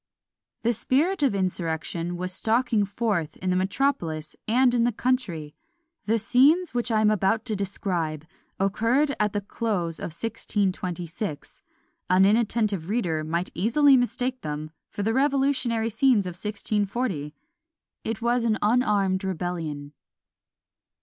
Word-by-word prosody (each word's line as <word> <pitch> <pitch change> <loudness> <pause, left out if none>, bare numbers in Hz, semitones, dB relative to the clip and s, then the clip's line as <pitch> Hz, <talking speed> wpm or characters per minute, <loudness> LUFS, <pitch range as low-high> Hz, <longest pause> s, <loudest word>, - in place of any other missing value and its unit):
The 235 +1 +2
spirit 305 - +1
of 270 -8 +2
insurrection 175 -2 -2
was 185 +1 -3
stalking 225 0 +1
forth 200 -7 -2
in 185 0 -2
the - - +1
metropolis 185 - -1
and 245 +2 +4
in 240 -1 +3
the 240 - +2
country. 205 - -2 0.5
The 225 +2 +2
scenes 275 - +4
which 245 0 -1
I 220 -2 +2
am 215 0 +4
about 215 +2 +1
to 220 - -1
describe 175 -6 -2 0.3
occurred 230 +9 +1
at 210 -1 +1
the 205 - -1
close 195 -6 -2
of - - -4
1626: 180 -3 -3 0.5
an 185 +1 +5
inattentive 210 -4 +1
reader 175 -9 0
might 170 +3 -2
easily 270 +9 +4
mistake 250 +1 0
them 150 +1 -5 0.2
for 205 - -4
the 225 +2 +1
revolutionary 265 -4 +1
scenes 230 -3 +3
of 180 - -3
1640. 205 - -2 0.7
It 225 0 -4
was 240 0 +2
an 220 -2 +2
unarmed 205 -4 +2
rebellion. 165 -6 -4
210 Hz, 130 wpm, -25 LUFS, 180-240 Hz, 0.7 s, an